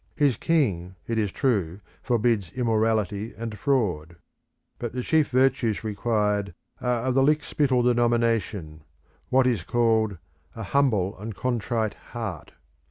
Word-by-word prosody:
His 145 -4 +3
king, 100 - 0
it 115 -1 0
is 105 -3 0
true, 100 -9 0 0.2
forbids 115 -6 +1
immorality 110 -3 0
and 115 -2 -5
fraud. 95 - 0 0.6
But 120 -2 -4
the 125 0 -3
chief 155 +1 +2
virtues 130 -4 +2
required 105 -3 -1 0.3
are 125 -2 0
of 130 0 0
the 135 - +3
lickspittle 145 -3 +2
denomination 115 -9 +1 0.5
what 130 0 +4
is 120 -7 +1
called 110 -1 +1 0.4
"a 115 - -6
humble 105 -6 +1
and 110 +2 -6
a - - -23
contrite 115 -3 -1
heart." 110 -10 -7
115 Hz, 130 wpm, -25 LUFS, 105-125 Hz, 0.6 s, what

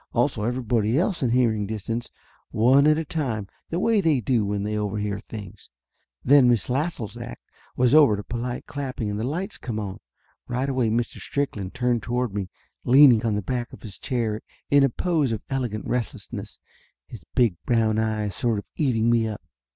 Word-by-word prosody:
Also 120 -1 +1
everybody 120 0 0
else 180 +2 0
in 125 - +2
hearing 115 -4 +2
distance, 110 +3 -4 0.4
one 130 +6 +4
at 155 0 +5
a 160 - -2
time, 125 -11 -2 0.2
the 170 - -1
way 220 +1 +3
they 155 -7 +3
do 120 -1 +1
when 100 0 -2
they 105 +1 -2
overhear 105 -1 -2
things. 105 -4 -10 0.6
Then 135 -2 +6
Miss 120 0 +1
Lassell's 125 - -2
act 120 0 -8 0.3
was 125 0 +3
over 145 -8 +7
to 105 - -5
polite 120 +2 -4
clapping 130 -6 -4
and 105 - -3
the 115 - -1
lights 175 +8 -4
come 110 -3 -4
on. 100 -3 -5 0.5
Right 125 +2 -1
away 130 -4 +1
Mr. 115 +2 -1
Strickland 105 -10 -3
turned 125 -2 +1
toward 125 -2 -2
me, 100 -2 -3 0.3
leaning 130 -3 +7
on 110 -3 +1
the 105 - -2
back 120 +3 -3
of - - -12
his 100 -4 -8
chair 115 -4 -2 0.3
in 140 0 +6
a 135 - +4
pose 155 -1 0
of 110 - -3
elegant 120 -6 -2
restlessness, 125 -3 -4 0.5
his 105 - -11
big 120 -8 +3
brown 110 -2 +2
eyes 110 -2 -1
sort 115 -3 0
of 100 - -5
eating 120 -7 +1
me 115 -1 +3
up. 105 -5 -6
120 Hz, 185 wpm, -24 LUFS, 110-130 Hz, 0.6 s, over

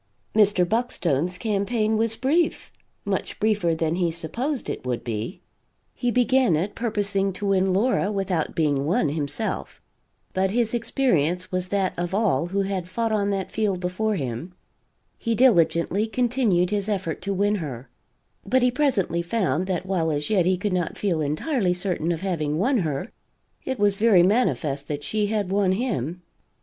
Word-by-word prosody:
Mr. 200 -4 +4
Buckstone's 180 - 0
campaign 215 +2 0
was 225 0 0
brief 300 +8 0 0.3
much - - -3
briefer 205 -6 +2
than 160 0 0
he 175 -2 +1
supposed 235 - -3
it - - -4
would 125 -2 -3
be. 115 - -4 0.5
He 245 - -1
began 250 -4 +3
it 185 +7 -1
purposing 200 -4 -1
to 205 - -5
win 190 -1 +2
Laura 205 +1 +1
without 195 -5 -1
being 145 -4 +1
won 165 -2 +2
himself; 145 +8 -3 0.5
but 190 0 +1
his 230 +2 0
experience 185 - 0
was 185 0 -1
that 195 -1 0
of 175 +2 -2
all 200 -5 +1
who 195 +3 0
had 190 -2 -3
fought 225 +4 -1
on 205 -2 +1
that 195 -2 -2
field 205 -4 0
before 190 +4 -1
him; 140 +4 -4 0.6
he 230 -1 0
diligently 200 -3 +3
continued 225 -7 +1
his 205 0 -1
effort 185 -6 -2
to 200 - -3
win 200 +2 +1
her, 135 -7 -6 0.6
but 255 +5 +2
he 250 - +4
presently 235 - +1
found 175 -3 0
that 185 -1 -2
while 180 -4 0
as 150 +4 -2
yet 185 -5 +3
he 185 0 +2
could 195 +1 -2
not 180 -2 -1
feel 175 -6 0
entirely 180 - 0
certain 180 -3 -1
of 165 -1 -3
having 155 -6 -1
won 250 - +2
her, 155 +2 -2 0.5
it 260 -1 -2
was 205 -2 +3
very 205 -5 +5
manifest 150 - +1
that 145 -1 -4
she 210 +3 0
had 205 -3 -1
won 195 -2 +2
him. 180 - -2
190 Hz, 165 wpm, -24 LUFS, 170-220 Hz, 0.6 s, very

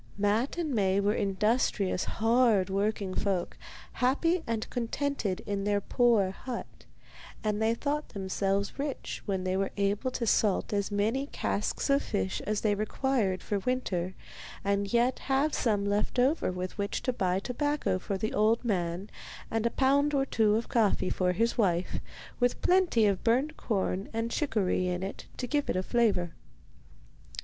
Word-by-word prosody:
Matte 210 +9 +1
and 320 -5 -1
Maie 195 -3 +2
were 200 +1 +2
industrious, 200 -1 +1
hard 225 -4 +2
working 200 -1 -1
folk, 190 -4 -1 0.4
happy 325 +8 +2
and 225 -1 -2
contented 245 -4 -2
in 200 -1 -2
their 205 0 +2
poor 220 -3 +2
hut, 245 +5 -7 0.6
and 210 0 0
they 225 +1 +2
thought 295 +4 -2
themselves 195 +2 -2
rich 280 -1 -4
when 190 -2 -1
they 185 0 0
were 195 0 0
able 200 +5 +1
to 245 -1 -3
salt 210 -2 +2
as 200 -1 0
many 220 +7 0
casks - - -2
of 275 +1 +4
fish 95 0 -2
as 210 0 0
they 210 -2 +2
required 215 -2 0
for 205 - -1
winter 190 -6 -2 0.5
and 200 0 0
yet 240 +2 +2
have 280 +3 +1
some 205 -4 +1
left 205 +4 0
over 260 - +2
with 180 +2 -5
which 200 0 -2
to 255 - 0
buy 185 -5 0
tobacco 270 0 -1
for 195 +1 -3
the 215 +3 -2
old 220 +3 +2
man, 180 -2 -1 0.4
and 225 +1 +1
a - - +1
pound 280 +3 +2
or 270 -1 +2
two 220 -5 +2
of 225 +1 -1
coffee 220 -7 +1
for 180 -1 +1
his 230 +6 0
wife, 180 -4 +1 0.4
with 245 0 +1
plenty 355 - +4
of 200 -3 +1
burned 260 +7 +2
corn 195 -3 -2
and 225 +1 -2
chicory 205 -11 0
in 180 0 -2
it 195 - -6
to 250 - -2
give 290 +3 -1
it - - +1
a 185 - 0
flavour. 200 -8 +1
215 Hz, 165 wpm, -29 LUFS, 195-250 Hz, 0.6 s, of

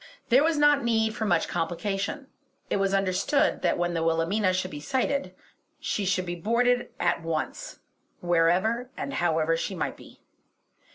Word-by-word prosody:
There 255 +4 +5
was 320 -1 +2
not 295 -1 +4
need 220 -2 +1
for 225 -2 -2
much 175 -4 +2
complication; 195 - -3 0.5
it - - +2
was 195 0 +1
understood 195 +7 +1
that - - +1
when 175 0 -1
the 165 - -1
Wilhelmina 165 +5 +1
should 185 0 -2
be 145 - -6
sighted 265 - -1 0.4
she 205 - -2
should 185 -1 0
be 175 - -3
boarded 240 +7 +1
at 175 -1 +1
once, 165 - -4 0.4
wherever 180 +8 +1
or - - -4
however 165 - +1
she 190 +4 -3
might 170 - -3
be. - - -16
195 Hz, 160 wpm, -27 LUFS, 170-240 Hz, 0.5 s, There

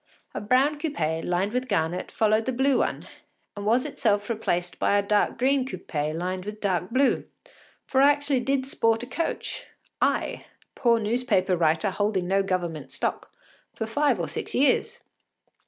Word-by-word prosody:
A - - -4
brown 265 +7 +2
coupé, 165 - -1
lined 185 +4 0
with 255 +1 -1
garnet, 160 -3 -1
followed 220 0 +2
the 260 - 0
blue 265 +2 +2
one, - - -1 0.5
and 205 0 -5
was 240 +4 +3
itself 205 -1 0
replaced 175 -6 -2
by 205 - +3
a 200 - +2
dark 205 +1 +1
green 265 +2 +2
coupé 155 - -3
lined 185 +2 -3
with 210 +2 -7
dark 185 -3 -1
blue, 260 +3 +2 0.6
for 265 - +2
I 285 +1 +7
actually 290 -2 0
did 265 +1 0
sport 225 -3 +1
a - - -4
coach 295 +7 -4 0.3
I, - - 0 0.3
poor 235 -2 +3
newspaper 215 -4 +1
writer 165 +3 +2
holding 200 -2 0
no 195 +1 +2
Government 175 -5 -3
stock - - -3 0.4
for 220 - -3
five 255 0 +1
or 170 - -2
six - - -5
years. 265 0 +2
215 Hz, 165 wpm, -26 LUFS, 185-255 Hz, 0.6 s, I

